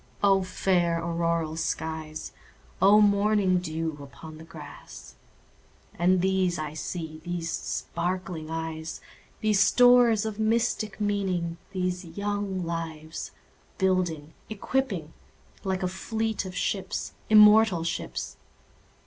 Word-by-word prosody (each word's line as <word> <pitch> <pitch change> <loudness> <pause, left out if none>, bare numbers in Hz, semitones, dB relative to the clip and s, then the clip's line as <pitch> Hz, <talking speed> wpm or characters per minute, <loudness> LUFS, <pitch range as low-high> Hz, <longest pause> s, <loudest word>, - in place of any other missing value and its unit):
O 195 -1 +5
fair 180 -2 +1
auroral 170 -1 -1
skies! 160 -1 -4 0.5
O 200 +2 +7
morning 200 -2 +3
dew 160 -3 -4
upon 150 +3 -11
the - - -10
grass! 160 - -11 0.8
And 180 +1 +2
these 190 -2 +1
I 155 -1 -4
see—these 165 +1 -5
sparkling 175 -2 -3
eyes, 160 0 -4 0.4
These 215 -2 +2
stores 240 +1 +5
of 220 -1 -4
mystic 220 -2 0
meaning—these 185 -2 -2
young 200 -3 -2
lives, 160 -1 -5 0.5
Building, 175 -5 0 0.2
equipping, 215 - -2 0.5
like 190 -1 -1
a - - +2
fleet 220 +3 -2
of 185 -1 -7
ships—immortal 210 +1 +4
ships! 165 - -4
185 Hz, 100 wpm, -27 LUFS, 165-205 Hz, 0.8 s, O